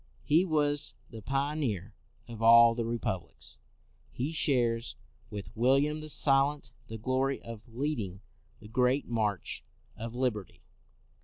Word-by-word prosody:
He 160 +5 +4
was 145 -3 +1 0.2
the 115 - -8
pioneer 135 - -2 0.3
of 115 -2 -9
all 115 +1 +8
the 115 0 -2
re 120 +1 -1
publics. 90 -6 -5 0.5
He 135 +6 -3
shares 120 -7 +1 0.3
with 100 -1 -8
William 140 +6 +2
the 155 - -7
Silent 140 -2 +2 0.2
the 110 - -6
glory 130 +4 0
of 115 -1 -9
leading 115 -8 -3 0.4
the 105 - -12
great 125 +5 +1
march 110 -5 -2 0.3
of 115 +1 -7
liberty. 120 -7 -2
120 Hz, 130 wpm, -30 LUFS, 115-140 Hz, 0.5 s, all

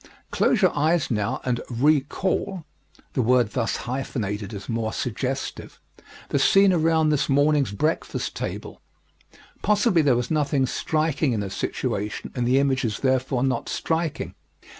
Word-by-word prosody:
Close 215 -5 +2
your 185 - +4
eyes 155 0 +1
now 110 +3 -1
and 125 -2 0
re 145 +5 +3
call 185 +4 -2 0.5
the 130 - +1
word 120 -2 +3
thus 115 - -1
hyphenated 110 -5 -3
is 100 -2 -8
more 115 -1 -2
suggestive 130 +4 -4 0.5
the - - +1
scene 195 -1 +5
around 160 -2 +3
this 150 -2 +1
morning's 145 -3 +3
breakfast 155 +11 -2
table. - - -6 0.8
Possibly 210 -4 +3
there 140 -5 +3
was 120 +3 -2
nothing 145 -3 +1
striking 155 0 0
in 110 - -1
the 100 -2 -4
situation 105 +1 -3
and 120 -2 -1
the 130 +2 +4
image 135 -2 +2
is 110 -4 -2
therefore 130 -1 +1
not 130 -3 -1
striking. 160 -2 -2
135 Hz, 145 wpm, -24 LUFS, 120-155 Hz, 0.8 s, scene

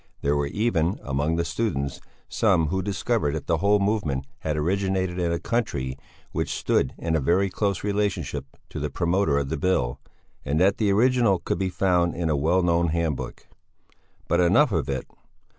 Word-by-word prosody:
There 70 +1 +1
were 70 0 0
even, 95 -1 0
among 70 +4 0
the 85 0 0
students, 85 -6 -2 0.3
some 90 -8 +2
who 95 +3 0
discovered 100 -4 -1
that 75 -3 -5
the 85 - +1
whole 100 +3 +4
movement 100 -10 0
had 75 -1 -2
originated 95 +2 0
in 85 -1 0
a 85 - 0
country 75 - -2 0.4
which - - -2
stood - - 0
in 80 -3 -1
very 95 +5 +2
close 100 -2 -1
relationship 95 -10 -1 0.2
to - - -6
the - - -2
promoter 85 -3 +1
of 70 -1 -1
the 80 - -2
Bill, 70 -7 0 0.4
and 75 +3 0
that 95 +2 +3
the 105 -3 +2
original 120 -1 +3
could - - -3
be 95 -1 0
found 90 -2 +1
in 85 -2 -1
a - - +2
well 85 +6 +2
known 85 0 +2
handbook. 80 -4 -2 0.8
But 85 - +2
enough 95 - +4
of 75 -7 -1
it! 65 -2 -2
85 Hz, 175 wpm, -25 LUFS, 75-100 Hz, 0.8 s, whole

